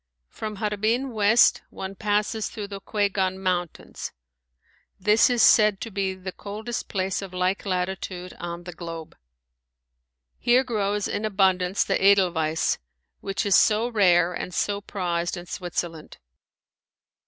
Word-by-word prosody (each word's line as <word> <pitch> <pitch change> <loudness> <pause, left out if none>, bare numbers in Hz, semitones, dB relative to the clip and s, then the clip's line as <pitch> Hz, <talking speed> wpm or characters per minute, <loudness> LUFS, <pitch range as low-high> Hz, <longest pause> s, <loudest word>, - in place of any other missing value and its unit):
From 215 -1 -6
Harbin 215 +6 0
west 220 +1 +4
one 190 0 -6
passes 210 +2 -1
through 210 -3 -7
the 200 -1 -7
Kuigan 195 -3 0
mountains. 180 -3 -3 0.9
This 210 +5 +4
is 245 -2 +3
said 210 -2 +6
to 230 - -5
be 190 -1 -1
the 185 0 -7
coldest 215 +5 -6
place 190 -1 -2
of 190 -2 -8
like 185 +2 0
latitude 180 -1 -3
on 170 0 -6
the 180 0 -8
globe. 165 -2 -8 1.2
Here 245 +2 +4
grows 210 -4 -1
in 205 - -3
abundance 190 -2 +2
the 195 - -1
Edelweiss, 175 -5 +3 0.4
which 195 +1 -3
is 200 - +4
so 220 +2 +4
rare 180 -6 +4
and 180 +1 -5
so 200 0 0
prized 175 -4 -2
in 175 - -8
Switzerland. 175 -3 -5
195 Hz, 130 wpm, -25 LUFS, 180-210 Hz, 1.2 s, said